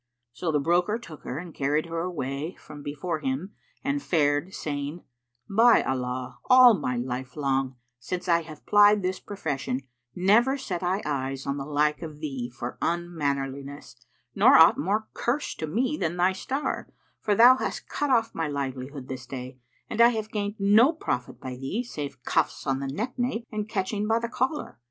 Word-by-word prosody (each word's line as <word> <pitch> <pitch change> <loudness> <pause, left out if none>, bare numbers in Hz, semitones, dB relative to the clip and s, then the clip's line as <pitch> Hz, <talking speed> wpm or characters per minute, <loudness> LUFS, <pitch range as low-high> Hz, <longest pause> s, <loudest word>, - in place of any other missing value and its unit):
So 160 +7 -2
the 150 - +2
broker 175 +8 +2
took 170 -10 -11
her 130 - -4
and 170 0 -7
carried 145 +3 0
her 165 0 -4
away 155 -2 -3
from 145 - -11
before 150 +3 -3
him 145 +7 -3 0.3
and 280 +1 0
fared, 150 - +1
saying, 145 0 -4 0.4
"By 230 +4 +5
Allah, 125 0 -3
all 255 -2 +9
my 125 - -1
life 125 +1 -4
long, 135 -3 0 0.2
since 180 +9 -4
I 170 -1 +4
have 155 -2 -12
plied 205 -1 +6
this 185 +1 -1
profession 140 -10 -3 0.3
never 230 +9 +4
set 185 -10 -4
I 185 +3 0
eyes 135 -2 -2
on 140 0 -2
the 135 - -4
like 150 +1 +1
of 155 -3 -7
thee 135 -6 -4
for 120 0 -7
unmannerliness 140 -5 -3 0.4
nor - - +7
aught - - +7
more 210 +6 0
curst 265 +5 -2
to 155 - -2
me 250 - 0
than 170 0 -2
thy 180 +2 +3
star, 270 +9 -3 0.3
for 210 - +1
thou 245 +4 +8
hast - - -4
cut 290 - -2
off 230 -3 +2
my 165 -1 -1
livelihood 135 -1 -4
this 130 -1 -7
day 130 0 -7 0.3
and 230 - 0
I 235 - +9
have 220 -2 -3
gained 205 -1 -2
no 215 +8 +5
profit 125 - -3
by 130 -1 -6
thee 135 - -3
save 145 - -7
cuffs 160 +4 0
on 135 -1 0
the 135 - -3
neck 225 - -4
nape 245 -2 -1
and 215 -1 -3
catching 205 +1 -1
by 225 +1 +3
the 230 0 -2
collar!" 260 - -2
165 Hz, 180 wpm, -26 LUFS, 140-210 Hz, 0.4 s, all